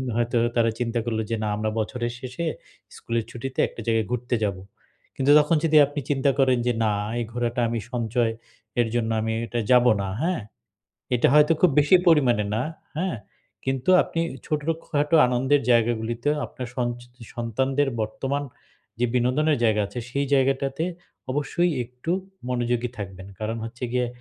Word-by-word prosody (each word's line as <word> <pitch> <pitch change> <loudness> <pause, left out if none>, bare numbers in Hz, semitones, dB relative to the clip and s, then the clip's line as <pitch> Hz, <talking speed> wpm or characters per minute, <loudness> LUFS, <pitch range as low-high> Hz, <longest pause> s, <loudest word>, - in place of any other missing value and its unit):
হয়তো 120 0 0 0.2
তারা 115 -1 +3
চিন্তা 120 -1 -1
করলো 110 -2 -1
যে, 115 - +2
না, 105 - -1
আমরা 110 +1 -1
বছরের 120 +2 -2
শেষে, 130 +6 -5 0.5
স্কুলের 115 -1 -2
ছুটিতে 130 +3 -6
একটা - - -9
জায়গায় 115 -3 +1
ঘুরতে 125 0 -1
যাব। 100 -2 -1 0.6
কিন্তু 135 +2 +2
তখন 150 +3 +3
যদি 155 -1 +4
আপনি 145 +1 -5
চিন্তা 140 -1 +2
করেন 130 -2 +4
যে, 125 - +3
না, 105 - +2 0.3
এই 120 - -1
ঘোরাটা 120 0 -1
আমি 115 0 -1
সঞ্চয়ের 115 0 -2
জন্য, 115 -1 0
আমি 110 - -1
এটা 115 +2 -3
যাব 125 0 +6 0.2
না। 100 - -2
হ্যাঁ? 175 -2 0 0.7
এটা 120 - +3
হয়তো 150 +1 +6
খুব 180 -5 +6
বেশি 145 +5 +5
পরিমাণে 130 -10 +4
না, 110 - 0 0.4
হ্যাঁ? 185 +1 -1 0.5
কিন্তু 135 +3 -1
আপনি 165 - -4 0.2
ই - - -10
ছোটখাটো 150 0 0
আনন্দের 130 +3 +2
জায়গাগুলিতেও 120 +4 +1
আপনার 125 - -7
সঞ্চ 120 -1 -1 0.4
সন্তানদের 130 +4 0
বর্তমান 135 +6 -2 0.6
যে 125 - +3
বিনোদনের 135 +5 +2
জায়গা 110 -1 +3
আছে, 110 +4 -6
সেই 140 +3 -1
জায়গাটাতে 135 +2 +1 0.5
অবশ্যই 155 +5 0
একটু 125 +7 -5 0.4
মনোযোগী 120 0 0
থাকবেন। 95 -2 -7
কারণ 110 +1 -2
হচ্ছে 120 +2 -5
গিয়ে, 125 -1 +1
125 Hz, 155 wpm, -24 LUFS, 115-140 Hz, 0.7 s, যাব